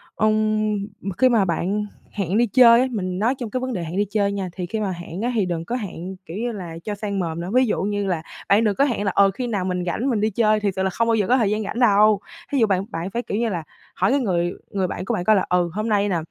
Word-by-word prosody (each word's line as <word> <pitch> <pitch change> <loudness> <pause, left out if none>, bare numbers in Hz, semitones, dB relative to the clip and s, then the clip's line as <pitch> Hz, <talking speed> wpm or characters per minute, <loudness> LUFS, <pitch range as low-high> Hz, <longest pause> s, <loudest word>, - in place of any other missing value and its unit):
ừm, 215 0 +1 0.4
khi 255 - +5
mà 225 -5 +3
bạn 190 +4 -1 0.3
hẹn 195 -1 -1
đi 240 +1 +3
chơi 235 +1 +7
á, 260 - +2
mình 185 -5 -3
nói 235 +6 +2
trong 240 -4 -4
cái 255 - -2
vấn 255 0 -3
đề 180 - -3
hẹn 165 +3 -5
đi 205 - +2
chơi 200 -2 +1
nha, 195 -2 -3
thì 180 -1 -4
khi 220 +5 -3
mà 205 -3 -1
hẹn 175 +1 -7
á, 240 +2 0
thì 210 -4 +2
đừng 170 -2 -3
có 240 - -3
hẹn, 190 -5 -5
kiểu 170 +3 -7
như 240 +2 -2
là, 175 -6 -7
cho 210 - -3
sang 200 -1 -3
mồm 170 -2 -3
nữa, 175 - -5
ví 255 +1 +5
dụ 220 - -1
như 205 0 -1
là, 175 -4 -1 0.3
bạn 200 +4 +5
đừng 210 -3 +1
có 280 - +3
hẹn 240 -7 -1
là, 195 - +1
ờ, 195 -1 +5
khi 245 +6 -4
nào 200 -6 -1
mình 180 -1 -2
rảnh, 225 +10 -1
mình 225 -5 0
đi 215 - +2
chơi, 215 0 +2
thiệt 205 -2 -1
sự 190 - -1
là 190 - +1
không 230 +5 0
bao 230 - +3
giờ 205 -3 +1
có 255 - +4
thời 220 -6 +2
gian 215 +1 -1
rảnh 210 - -4
đâu. 215 -3 +5 0.3
Thí 280 - +1
dụ 225 - +4
bạn 190 -1 0
bạn 165 +2 -4
phải, 235 - -2
kiểu 205 - -3
như 230 0 0
là, 175 -5 -3 0.3
hỏi 190 +2 +2
cái 280 - +3
người 175 -7 0 0.2
người 190 -2 0
bạn 185 - -5
của 235 - -1
bạn 180 - -1
coi 215 - +5
là, 190 - +1
ừ, 180 -1 +2
hôm 215 +2 -2
nay 205 -1 +2
nè, 180 - +1
205 Hz, 305 wpm, -22 LUFS, 185-225 Hz, 0.4 s, chơi